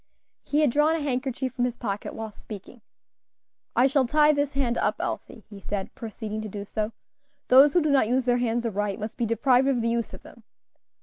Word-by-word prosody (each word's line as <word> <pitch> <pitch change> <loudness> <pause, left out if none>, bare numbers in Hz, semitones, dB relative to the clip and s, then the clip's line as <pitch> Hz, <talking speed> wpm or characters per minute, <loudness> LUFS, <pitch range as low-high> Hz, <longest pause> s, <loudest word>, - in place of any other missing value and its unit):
He 295 +1 +1
had 295 -5 +3
drawn 300 +4 +3
a - - -1
handkerchief 260 -2 -2
from 245 -1 0
his 250 -1 -2
pocket 205 -4 -4
while 220 -1 -6
speaking. 210 +3 -11 0.9
"I 245 - +5
shall 270 -1 +2
tie 300 +3 +4
this 285 0 -1
hand 250 -3 0
up, 210 - +1
Elsie," 220 - -5
he 205 -2 -11
said, 195 0 -4
proceeding 215 -1 -6
to 215 - -6
do 200 0 -6
so; 215 +1 -3 0.6
"those 270 +3 +7
who 350 - +3
do 305 - +1
not 270 -6 +4
use 255 +2 +1
their 245 -1 +3
hands 240 -1 -1
aright 205 -2 -2
must 215 +1 -5
be 235 - -1
deprived 250 +4 +3
of 270 -3 +2
the 230 0 0
use 235 -1 -1
of - - -15
them. 235 - -15
240 Hz, 210 wpm, -26 LUFS, 215-270 Hz, 0.9 s, those